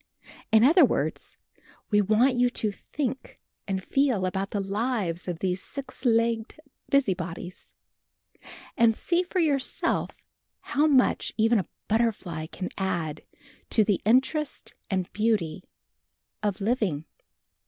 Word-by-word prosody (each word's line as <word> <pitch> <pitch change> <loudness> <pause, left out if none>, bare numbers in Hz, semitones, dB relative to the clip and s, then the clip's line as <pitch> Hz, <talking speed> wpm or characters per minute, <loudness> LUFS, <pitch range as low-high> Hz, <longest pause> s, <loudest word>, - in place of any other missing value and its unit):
In 220 0 +6
other 325 +8 +7
words, - - -1 0.5
we 210 0 +5
want 220 +6 +3
you 245 0 +3
to 220 -3 -2
think 265 +5 -5 0.3
and 190 -1 -2
feel 255 -8 +1
about 190 +2 -2
the 205 - -2
lives 195 -3 -2
of 175 -2 -3
these 180 +1 -1
six 275 -1 -6
legged 230 +2 +1 0.3
busybodies, 180 -9 -1 1.0
and 230 -2 +4
see 345 +8 +1
for 365 +1 -5
yourselves 290 -6 0 0.5
how 295 +2 +1
much 265 -4 +2
even 225 0 +4
a 185 - -4 0.2
butterfly 205 -8 -1
can 185 +3 -5
add 165 -5 -2 0.5
to 220 - +4
the 205 -2 +1
interest 265 +7 +1 0.2
and 185 -3 -2
beauty 205 -6 0 0.8
of 205 -2 -1
living. 195 - 0
215 Hz, 120 wpm, -26 LUFS, 190-255 Hz, 1.0 s, other